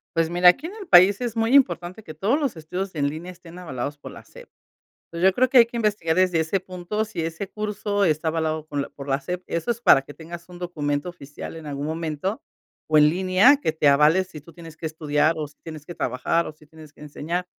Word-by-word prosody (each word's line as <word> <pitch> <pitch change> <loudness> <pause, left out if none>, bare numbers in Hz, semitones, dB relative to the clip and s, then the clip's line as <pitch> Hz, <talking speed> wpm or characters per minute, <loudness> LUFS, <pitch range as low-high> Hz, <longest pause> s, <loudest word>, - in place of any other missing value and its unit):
Pues, 165 0 +1
mira, 175 +1 +6
aquí 290 - +1
en 385 - -9
el 410 -4 -9
país, 190 +4 +6
es 235 -2 -3
muy 225 +2 +1
importante 185 - +2
que 155 - -9
todos 200 - +1
los 280 - -2
estudios 180 +4 -5
en 145 -2 0
línea 165 +5 -7
estén 175 -1 -14
avalados 145 -4 -5
por - - -10
la - - -13
SEP. - - -15 0.6
Entonces, 170 +3 +2
yo - - -3
creo 255 +1 +3
que 255 0 +5
hay 235 - +8
que 235 - -6
investigar 205 -8 0
desde 185 -2 +2
ese 160 +5 0
punto, 185 +4 -4
si 200 -6 -5
ese 165 +4 -4
curso 210 -1 -2
está 160 -2 +1
avalado 160 -1 -2
con 145 -2 -3
la - - -6
por 140 0 -11
la 135 0 0
SEP. 180 +4 -5
Eso 170 +5 -3
es 235 -1 0
para 140 - +6
que 145 +1 -13
tengas 170 +2 -10
un 180 - -11
documento 150 -4 -3
oficial 145 -2 -9
en 160 -2 -9
algún 140 0 -4
momento, 160 +5 -3 0.5
o 155 -1 +3
en 150 0 +6
línea, 190 - +4
que 270 - -1
te 155 -2 +1
avale 150 +6 +5
si 160 -6 -12
tú 165 +3 -16
tienes 165 -1 -12
que 160 0 -5
estudiar 155 0 0
o 150 -1 -3
si 150 - -21
tienes 155 -2 -9
que 175 - -8
trabajar, 130 +7 -1
o - - -6
si 155 0 -21
tienes 155 0 -15
que - - -19
enseñar. 160 +4 -4
170 Hz, 245 wpm, -23 LUFS, 155-190 Hz, 0.6 s, hay